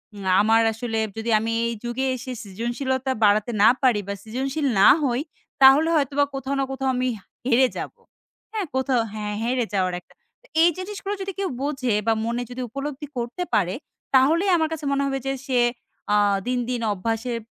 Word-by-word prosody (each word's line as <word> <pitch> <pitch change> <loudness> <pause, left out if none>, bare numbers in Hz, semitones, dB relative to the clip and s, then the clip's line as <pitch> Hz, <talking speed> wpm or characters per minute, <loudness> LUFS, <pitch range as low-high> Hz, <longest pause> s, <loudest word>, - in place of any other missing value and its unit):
উম 200 -1 -8 0.2
আমার 225 +2 +4
আসলে 225 0 -3 0.2
যদি 225 +1 -3
আমি 225 +1 -2 0.2
এই 235 - -2
যুগে 240 +2 -2
এসে 255 +1 -7
সৃজনশীলতা 245 +6 -2
বাড়াতে 210 +2 +3
না - - +8
পারি 245 -5 +3
বা 200 - -2
সৃজনশীল 265 +6 -3
না 195 - +7 0.2
হই। 250 0 +1 0.4
তাহলে 270 +4 +7
হয়তোবা 285 -1 +2
কোথাও 270 +1 -3
না - - +2
কোথাও 270 0 -1
আমি 255 +1 0
হা - - -23 0.2
হেরে 260 +1 +5
যাবো, - - -7 0.5
হ্যাঁ? 430 -3 -2
কোথাও 260 -2 +2
হ্যাঁ, 210 -1 -4
হেরে 245 +1 0
যাওয়ার 185 -2 +1
একটা। - - -25 0.5
এই 340 - +7
জিনিসগুলো 400 +1 -5
যদি 390 0 -3
কেউ 390 -2 -1
বোঝে 265 -5 -1
বা 225 - +5
মনে 235 +1 -1
যদি 250 +1 -5
উপলব্ধি 280 +3 -5
করতে 240 +9 -3
পারে। 185 -3 +2 0.4
তাহলেই 325 +9 +4
আমার 320 -1 +1
কাছে 300 -2 -6
মনে 280 0 +1
হবে 270 0 -1
যে - - +1 0.2
সে 255 -2 +2 0.5
আ - - +5 0.3
দিন, 250 0 0
দিন 245 -2 -2
অভ্যাসের 225 +4 -2
255 Hz, 180 wpm, -23 LUFS, 225-275 Hz, 0.5 s, না